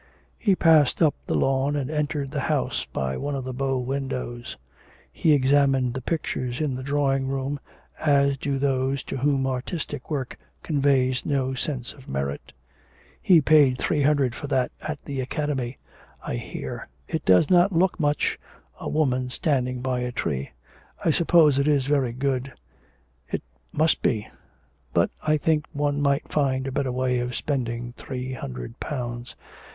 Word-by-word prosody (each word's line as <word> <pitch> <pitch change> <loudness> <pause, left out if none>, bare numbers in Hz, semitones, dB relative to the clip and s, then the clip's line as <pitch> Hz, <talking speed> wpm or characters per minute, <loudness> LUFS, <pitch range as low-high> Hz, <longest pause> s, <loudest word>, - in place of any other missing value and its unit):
He 200 -5 +3
passed 160 -6 +5
up 155 -4 +4
the - - 0
lawn 135 +2 +2
and 140 -1 -2
entered 150 -2 -1
the 150 - -2
house 145 0 -1
by 65 0 -2
one 145 0 -2
of 135 - -3
the 130 0 -5
bow 135 +1 0
windows. 125 -2 -4 0.5
He 160 - +2
examined 135 -2 +3
the 130 - -4
pictures 130 -4 -2
in 150 -4 0
the 130 - -4
drawing 135 -1 +1
room, 135 +1 -2 0.4
as 140 -2 +3
do 140 0 -1
those 135 0 0
to - - -5
whom 135 0 +1
artistic 130 +2 -4
work 135 -5 -3 0.2
conveys 135 -4 +2
no 135 -2 0
sense 130 -2 -3
of 135 -3 -15
merit. 70 +1 -3 0.7
'He 170 -4 +6
paid 145 -3 +5
three 150 +3 0
hundred 140 -3 +3
for 145 - -6
that 130 -3 +1
at 155 -1 -5
the 140 -2 -3
Academy, 135 -2 -2 0.5
I - - -3
hear. - - -6 0.2
It - - -2
does 95 - +5
not 180 +2 +5
look 185 +2 +2
much 145 -1 +1 0.4
a - - -4
woman 130 -5 +1
standing 125 -2 0
by 130 -1 -1
a 125 0 -2
tree. 70 - -2 0.6
I 165 - +5
suppose 160 -4 +4
it 140 - +2
is 145 -3 +3
very 135 -4 +2
good; 130 +1 -1 0.8
it - - -3 0.3
must 155 +2 +2
be 110 -3 +1
good; - - -17 0.6
but - - +3
I 155 0 +2
think 155 0 +1
one 145 -1 0
might 140 0 +1
find 135 -3 +1
a 135 - -3
better 130 0 -1
way 125 0 0
of 125 0 -3
spending 120 -4 -2
three 130 0 -5
hundred 65 - -7
pounds. 120 -3 -5
135 Hz, 165 wpm, -25 LUFS, 125-145 Hz, 0.8 s, He